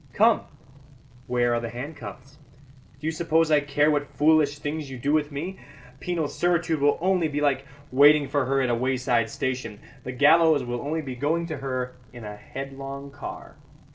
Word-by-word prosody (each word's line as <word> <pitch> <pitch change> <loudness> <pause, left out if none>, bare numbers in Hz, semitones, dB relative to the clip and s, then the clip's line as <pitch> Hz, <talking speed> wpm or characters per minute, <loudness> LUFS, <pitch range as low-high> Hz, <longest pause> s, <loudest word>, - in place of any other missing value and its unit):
Come, - - +4 0.9
where 120 -1 +1
are 120 - +1
the 115 0 -5
handcuffs? 135 +1 -9 0.6
Do 150 - -9
you 160 - +1
suppose 165 -1 +1
I 150 - +6
care 145 +1 +2
what 145 -1 0
foolish 150 -1 +4
things 145 0 -4
you 130 - -7
do 140 +5 0
with 150 -1 +1
me? 170 +7 -5 0.4
Penal 170 -4 -1
servitude 170 -2 0
will 145 0 +3
only 180 -2 +2
be 145 -1 -3
like 140 -2 +1 0.2
waiting 145 +2 +6
for 145 -2 0
her 135 0 +2
at 125 - +1
a - - +2
wayside 125 -2 +1
station. 125 -5 -3 0.2
The 125 - -5
gallows 150 +2 +5
will 120 0 -4
only 155 +2 -2
be 130 -3 -5
going 160 +6 0
to 155 - -3
her 130 -2 -4
in 120 -2 -11
a 105 -1 -7
headlong 135 +4 -7
car." 145 - -9
145 Hz, 180 wpm, -25 LUFS, 130-155 Hz, 0.9 s, I